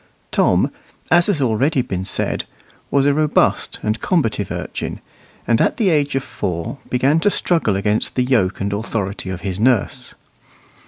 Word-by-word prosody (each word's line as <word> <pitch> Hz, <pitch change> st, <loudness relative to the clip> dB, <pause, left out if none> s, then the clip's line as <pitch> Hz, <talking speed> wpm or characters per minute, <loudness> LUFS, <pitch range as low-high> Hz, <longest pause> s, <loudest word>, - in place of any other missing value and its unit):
Tom, -, -, +2 dB, 0.4 s
as 175 Hz, 0 st, +5 dB
has 200 Hz, -5 st, +2 dB
been 140 Hz, -, +1 dB
already 130 Hz, +4 st, +1 dB, 0.2 s
said, 100 Hz, -, 0 dB, 0.4 s
was 140 Hz, -1 st, +2 dB
a 145 Hz, -, +4 dB
robust 150 Hz, 0 st, +1 dB
and 110 Hz, +2 st, -1 dB
combative 115 Hz, -, 0 dB
urchin, -, -, -4 dB, 0.5 s
and 115 Hz, -1 st, +2 dB
at -, -, +1 dB
the 205 Hz, -6 st, +2 dB
age 145 Hz, -3 st, +1 dB
of 135 Hz, -, 0 dB
four 115 Hz, -, -4 dB
began 135 Hz, +5 st, +2 dB
to 205 Hz, -, +3 dB
struggle 165 Hz, -, +1 dB
against 105 Hz, +2 st, 0 dB
the 125 Hz, -, +2 dB
yoke 115 Hz, -8 st, +1 dB
and 100 Hz, +1 st, -1 dB
authority 100 Hz, -3 st, -3 dB
of 90 Hz, -1 st, -5 dB
his 95 Hz, -1 st, -4 dB
nurse. 120 Hz, -2 st, +1 dB
120 Hz, 160 wpm, -19 LUFS, 105-145 Hz, 0.5 s, as